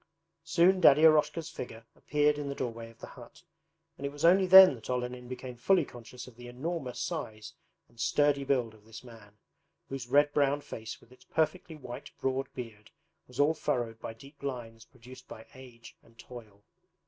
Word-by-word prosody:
Soon 175 +3 +3
Daddy 150 -2 +7
Eroshka's 155 +1 +3
figure 115 -2 -8
appeared 150 0 +1
in 145 -1 -4
the 140 - -4
doorway 115 -3 -5
of 115 - -19
the - - -9
hut, - - -14 0.5
and - - -10
it - - -6
was 145 +3 -3
only 185 +2 +5
then 190 -2 +10
that 115 -2 -11
Olenin 125 0 -3
became 130 0 -7
fully 175 +6 +3
conscious 125 0 -11
of 125 - -15
the 120 +1 -11
enormous 135 +1 -5
size 110 -10 -5 0.3
and 115 - -24
sturdy 145 +2 +2
build 125 -5 0
of 110 -1 -20
this 110 +2 -12
man, 110 -4 -15 0.5
whose 135 -3 -6
red 145 +3 +3
brown 145 0 +2
face 110 -5 -8
with 115 - -23
its 130 - -19
perfectly 160 +1 -2
white 125 -5 -9
broad 135 0 -2
beard 110 -4 -9 0.4
was 125 +1 -12
all 145 +2 +4
furrowed 120 -7 -2
by 115 - -7
deep 140 +5 -16
lines 115 -5 -6
produced 125 +2 -15
by 110 - -11
age 125 -3 -14
and 115 0 -24
toil. 110 -5 -13
130 Hz, 185 wpm, -30 LUFS, 115-145 Hz, 0.5 s, then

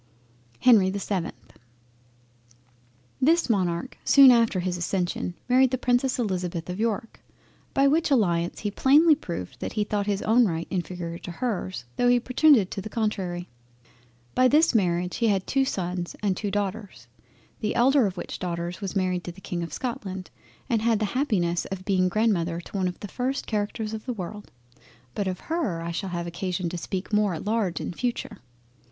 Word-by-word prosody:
HENRY 215 -7 +6
the 195 - -3
7th 195 -3 -2 1.9
This 320 -1 +3
Monarch 180 +2 -1
soon 275 -2 +8
after 230 -5 +3
his 180 0 -1
accession 175 0 -2
married 255 +1 +5
the 255 - -1
Princess 250 +1 +1
Elizabeth 180 -6 -2
of 180 - -6
York, 225 0 -2 0.5
by 275 - +4
which 315 +3 +2
alliance 175 -10 +1
he 205 - -2
plainly 300 +9 +5
proved 170 - -5
that - - -4
he 215 - +1
thought 205 -1 -2
his 200 -1 -1
own 230 +2 +4
right 165 -2 -3
inferior 175 -2 -4
to - - -8
hers, 185 - -3
tho' 245 - +3
he 245 0 +5
pretended 255 - +4
to 195 - -4
the 215 - -7
contrary. 190 -6 -2 0.9
By 255 - +5
this 305 +4 +4
Marriage 180 -4 +1
he 230 - +2
had 195 -3 +1
two 270 -1 +1
sons 180 -5 -3
and 195 -3 +1
two 205 - -3
daughters, 200 - -4 0.5
the 215 - -2
elder 260 -1 +4
of 190 -1 -6
which - - -6
Daughters 175 +1 -4
was 195 -1 -4
married 185 -2 0
to 175 - -4
the 180 - -15
King 175 -2 -4
of 170 - -5
Scotland 190 -7 -5 0.4
and 230 -4 +1
had 230 0 +3
the 215 - 0
happiness 195 - 0
of 190 -1 -6
being 185 -2 +2
grandmother 180 -5 +1
to 175 - -11
one 185 -1 +1
of 180 - -5
the 205 - -5
first 255 +6 -2
Characters 215 +1 -2
in 220 - -4
the 250 - -1
World. 205 0 -7 0.6
But 200 - -2
of 185 -1 -3
her, 265 - -2
I 170 - -3
shall 190 +3 -3
have 175 -1 -3
occasion 175 +1 -3
to 175 - -5
speak 190 +4 -5
more 210 -4 +2
at 160 - -7
large 210 -5 0
in - - -4
future. 235 -1 -3
200 Hz, 185 wpm, -26 LUFS, 180-235 Hz, 1.9 s, soon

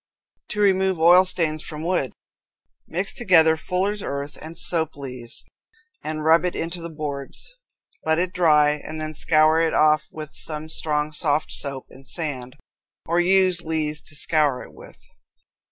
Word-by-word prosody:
To 210 - -5
Remove 190 -3 +3
Oil 175 +3 +7
Stains 160 -4 -1
from 155 0 -7
Wood. 170 -8 0 0.8
Mix 185 +4 -2
together 165 -8 +5
fuller's 190 +5 -2
earth 140 -1 -4
and 160 +1 -9
soap 160 -3 -1
lees, 125 -4 -6 0.6
and 155 0 -4
rub 160 +2 +5
it 180 - -1
into 170 +1 -4
the 170 - -6
boards. 150 - -6 0.5
Let 160 0 +2
it 180 +1 -1
dry 150 -4 +4
and 150 +1 -6
then 155 0 -4
scour 155 +1 +3
it 165 -1 +1
off 155 0 +3
with 155 -1 -8
some 155 0 -3
strong 150 -1 -1
soft 150 -1 0
soap 140 -2 -4
and 135 +1 -14
sand, 130 -7 -4 0.5
or 170 +2 +1
use 185 0 +3
lees 155 -2 -1
to 155 - -7
scour 150 -4 +1
it - - -14
with. - - -14
160 Hz, 155 wpm, -23 LUFS, 150-175 Hz, 0.8 s, Oil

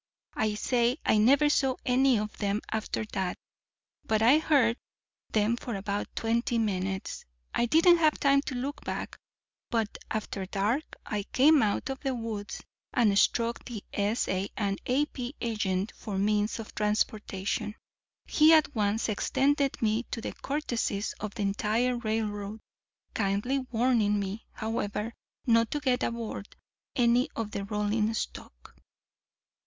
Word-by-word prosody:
I 215 -1 0
say 240 +3 +1
I 215 - +4
never 275 +7 +5
saw 270 -3 +2
any 255 0 +4
of 210 0 -3
them 205 0 0
after 220 0 -2
that; 190 -3 -1 0.7
but 220 0 +1
I 265 +7 +6
heard 260 -7 +3 0.5
them 220 +2 +2
for 240 -2 -5
about 200 +1 -2
twenty 235 +1 0
minutes. 190 -3 -2 0.3
I 240 - +1
didn't 335 +6 +6
have 310 -2 +3
time 275 0 +4
to 265 - -3
look 275 +4 -4
back. - - -4 0.5
But 225 -3 -1
after 205 -3 -3
dark 215 +10 -1
I 210 -1 -2
came 290 +3 +6
out 215 +5 0
of 265 - -5
the 265 -2 -2
woods 225 -3 -5 0.3
and 215 -5 +3
struck 230 +3 +2
the 230 -5 -7
S.A. 200 -2 0
& - - -33 0.3
A.P. 260 0 -1
agent 210 -3 -1
for 205 -4 -5
means 210 +2 +1
of 225 -2 -8
transportation. 210 0 -1 0.5
He 310 +1 +6
at 310 -2 +4
once 210 0 0
extended 275 +6 +1
to - - -7
me 220 +2 +1
the 230 - -4
courtesies 240 -8 -1
of 215 0 -5
the 215 - -2
entire 220 +5 +1
railroad, 215 -2 -2 0.5
kindly 210 +6 0
warning 225 -4 +2
me, 200 +2 -5
however, 220 0 -3 0.3
not 230 -2 +4
to 295 - -1
get 255 -3 +1
aboard 230 -3 -4 0.4
any 245 -1 +3
of 220 -2 -3
the 200 - -3
rolling 210 +1 0
stock. - - -7
225 Hz, 140 wpm, -29 LUFS, 210-250 Hz, 0.7 s, I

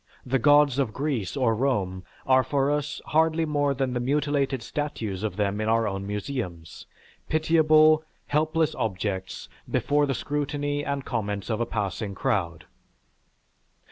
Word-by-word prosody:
The 135 +1 +1
Gods 145 0 +5
of 125 -6 0
Greece 135 -6 -2
or 125 -4 +2
Rome 100 -7 -1 0.2
are 130 0 +4
for 140 0 +1
us 150 0 -2
hardly 160 +1 +2
more 145 -2 0
than 130 -1 -1
the 125 - -1
mutilated 140 -1 0
statues 115 -8 -4
of 105 -4 -3
them 105 0 -1
in 110 - -1
our 115 0 +2
own 95 0 -4
museums; 105 - -5 0.4
pitiable, 155 -1 +4 0.2
helpless 155 +1 +1
objects 95 -2 -3 0.2
before 145 0 +1
the 135 - -1
scrutiny 145 +1 -2
and 140 -2 -3
comments 105 -3 -3
of 110 +1 -1
a 120 - 0
passing 100 -2 -3
crowd. 85 -5 -1
135 Hz, 140 wpm, -26 LUFS, 105-145 Hz, 0.4 s, Gods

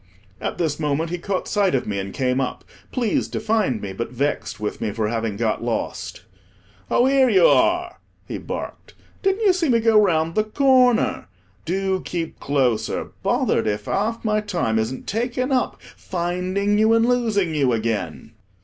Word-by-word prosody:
At - - -3
this 160 -3 -1
moment 155 +2 -1
he 175 - -3
caught 190 +1 -2
sight 200 -7 +2
of 130 - 0
me, 100 -2 -2
and 95 0 -5
came 130 +2 0
up, 130 - -4 0.3
pleased 240 -5 0
to - - -1
find 210 - +1
me, 100 -2 -6
but 115 +5 -4
vexed 140 -2 -2
with 105 0 -4
me - - -1
for 105 0 -1
having 115 -3 -2
got 110 0 -1
lost. 120 -1 -3 0.7
"Oh, 245 - +3
here 265 -1 +4
you 190 -6 +5
are," 350 - +3 0.3
he - - -5
barked; - - -7 0.3
"didn't 390 +2 +1
you 385 - +6
see 350 -5 0
me 235 -2 +4
go 220 -1 +5
round 165 -4 +1
the 215 - +2
corner? 255 +1 +3 0.4
Do 190 +1 -1
keep 170 -2 -4
closer. 130 -6 0
Bothered - - +1
if 105 0 -2
half 225 +4 -1
my 215 -1 +2
time 170 - -1
isn't 115 +4 -3
taken 245 +4 -2
up, 255 -2 0 0.2
finding 185 +3 -1
you 220 +1 +4
and 230 0 +4
losing 220 -8 +1
you 140 -4 +2
again." 115 -2 -2
180 Hz, 175 wpm, -22 LUFS, -, 0.7 s, you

